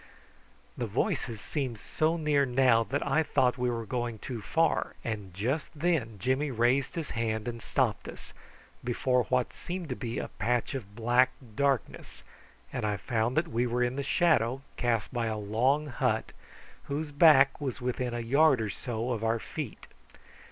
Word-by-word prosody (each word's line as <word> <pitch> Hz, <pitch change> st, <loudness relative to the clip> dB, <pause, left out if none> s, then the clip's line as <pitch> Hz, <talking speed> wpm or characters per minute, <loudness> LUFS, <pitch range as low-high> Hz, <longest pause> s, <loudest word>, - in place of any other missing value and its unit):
The 120 Hz, -, -1 dB
voices 115 Hz, +1 st, -1 dB
seemed 130 Hz, -1 st, -3 dB
so 155 Hz, +9 st, 0 dB
near 150 Hz, -3 st, +2 dB
now 125 Hz, -3 st, +4 dB
that 140 Hz, +5 st, -2 dB
I 155 Hz, +4 st, +3 dB
thought 130 Hz, -5 st, +1 dB
we 125 Hz, 0 st, +1 dB
were 115 Hz, -1 st, -3 dB
going 120 Hz, 0 st, -2 dB
too 115 Hz, +1 st, -6 dB
far, 165 Hz, +9 st, +1 dB
and 105 Hz, -4 st, -4 dB
just 125 Hz, -, -2 dB
then 150 Hz, -9 st, 0 dB
Jimmy 130 Hz, +8 st, 0 dB
raised 125 Hz, +6 st, +1 dB
his 165 Hz, -3 st, -4 dB
hand 110 Hz, -1 st, -2 dB
and 120 Hz, -1 st, -4 dB
stopped -, -, 0 dB
us, -, -, -10 dB, 0.5 s
before 125 Hz, 0 st, +1 dB
what 125 Hz, -1 st, 0 dB
seemed 175 Hz, -2 st, -6 dB
to 125 Hz, -, -2 dB
be 120 Hz, -3 st, -4 dB
a -, -, -3 dB
patch 120 Hz, +5 st, -1 dB
of 100 Hz, -7 st, -6 dB
black 120 Hz, +3 st, +3 dB, 0.2 s
darkness, 140 Hz, -2 st, -1 dB, 0.5 s
and -, -, -3 dB
I 105 Hz, -1 st, 0 dB
found 115 Hz, +3 st, -1 dB
that 165 Hz, +1 st, +2 dB
we 120 Hz, -2 st, 0 dB
were 120 Hz, +1 st, +1 dB
in 125 Hz, +1 st, 0 dB
the 140 Hz, -, -1 dB
shadow 135 Hz, -5 st, +2 dB
cast 120 Hz, -2 st, 0 dB
by 120 Hz, -2 st, 0 dB
a 110 Hz, -1 st, -2 dB
long 120 Hz, +8 st, +1 dB
hut, 135 Hz, -5 st, -1 dB, 0.5 s
whose 145 Hz, +2 st, -3 dB
back 145 Hz, -2 st, +6 dB
was 135 Hz, -3 st, -3 dB
within 125 Hz, -1 st, -2 dB
a 120 Hz, -, -2 dB
yard 140 Hz, +3 st, +4 dB
or 110 Hz, -2 st, -2 dB
so 120 Hz, +2 st, -3 dB
of 115 Hz, -2 st, -2 dB
our 115 Hz, 0 st, +2 dB
feet. 135 Hz, +1 st, -6 dB
125 Hz, 175 wpm, -29 LUFS, 115-140 Hz, 0.5 s, back